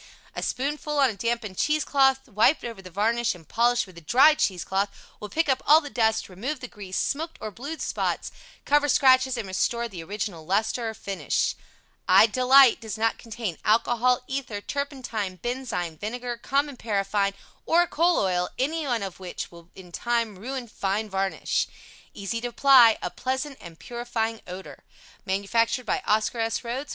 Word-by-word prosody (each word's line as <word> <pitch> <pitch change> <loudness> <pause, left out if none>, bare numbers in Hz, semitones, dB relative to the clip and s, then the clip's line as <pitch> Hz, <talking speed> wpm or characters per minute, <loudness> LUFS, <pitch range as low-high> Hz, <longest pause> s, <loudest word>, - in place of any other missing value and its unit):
A - - -3
spoonful 295 +3 -2
on 270 -4 +4
a - - -9
dampened 230 -2 -3
cheese 305 0 +1
cloth 270 -1 +3
wiped 220 +9 +3
over 230 -5 -6
the 185 - -11
varnish 225 +4 0
and 165 -4 -16
polished 240 +1 +2
with 185 -3 -16
a - - -19
dry 265 - +6
cheese 185 - 0
cloth 195 +3 0 0.3
will 210 - -7
pick 325 +8 0
up 265 -1 +1
all 305 +2 +8
the 290 -3 -9
dust, 220 -2 +1
remove 245 +11 -4
the 255 - -7
grease, 195 -5 -7
smoked 320 +4 -2
or 215 - -5
blued 285 - -6
spots, - - -2 0.3
cover 290 0 +3
scratches 260 -1 +4
and 225 -4 -4
restore 235 +5 0
the 190 -7 -8
original 195 -2 -5
lustre 220 +6 0
or 220 - -7
finish. 195 -1 -1 0.5
I - - +8
DE 230 +3 -3
LITE 265 -1 +7
does 220 -1 -5
not 225 0 0
contain 220 -6 -5
alcohol, 240 +3 +2
ether, 260 -6 -4
turpentine, 245 -7 -4
benzine, 180 -8 -4
vinegar, 240 +3 -4
common 280 +3 -1
paraffine 200 -2 0 0.3
or 345 +1 +4
coal 340 +1 +2
oil, 180 -2 0
anyone 270 -5 -1
of 190 -2 -7
which 185 -2 -6
will 170 0 -15
in 180 -2 -13
time 230 +1 -1
ruin 255 +3 -5
fine 205 0 -2
varnish. 195 0 -1 0.5
Easy 210 +3 -3
to 245 - -2
apply, 245 -2 +6
a - - -2
pleasant 265 +2 -3
and 170 -2 -11
purifying 235 -1 -3
odor. 185 +1 -9 0.4
Manufactured 230 +6 0
by - - 0
OSCAR 220 +3 +1
S. 225 0 -1
RHOADS. 255 +5 -4
230 Hz, 175 wpm, -26 LUFS, 200-265 Hz, 0.5 s, all